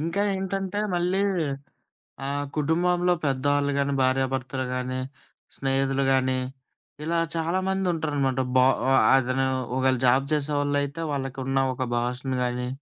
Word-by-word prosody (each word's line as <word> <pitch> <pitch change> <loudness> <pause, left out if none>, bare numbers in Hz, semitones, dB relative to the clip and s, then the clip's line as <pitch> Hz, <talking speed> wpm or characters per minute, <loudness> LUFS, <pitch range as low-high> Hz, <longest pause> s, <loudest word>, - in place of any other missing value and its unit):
ఇంకా 170 +6 -1
ఏంటంటే, 195 +1 -3 0.2
మళ్ళీ 180 +2 +1 1.1
ఆహ్, 145 +1 -2
కుటుంబంలో 175 +4 +2
పెద్దవాళ్ళు 145 +1 +1
గానీ, 140 0 0
భార్యాభర్తలు 130 0 0
గానీ, 130 0 -3 0.6
స్నేహితులు 135 0 0
గానీ, 130 -1 +2 0.7
ఇలా 170 +1 0 0.2
చాలామందుంటరనమాట. 165 -6 0 0.2
బ - - +7 0.3
ఆహ్, 135 - +5 0.2
అతనూ 130 +1 0 0.3
ఒకవేళ 130 -1 +2
జాబ్ 130 +2 +4
చేసేవాళ్ళయితే, 145 0 0
వాళ్ళకున్న 135 -1 -2 0.2
ఒక 130 0 -3
బాసును 125 +2 -1
గానీ, 125 0 -2
140 Hz, 110 wpm, -25 LUFS, 130-165 Hz, 1.1 s, బ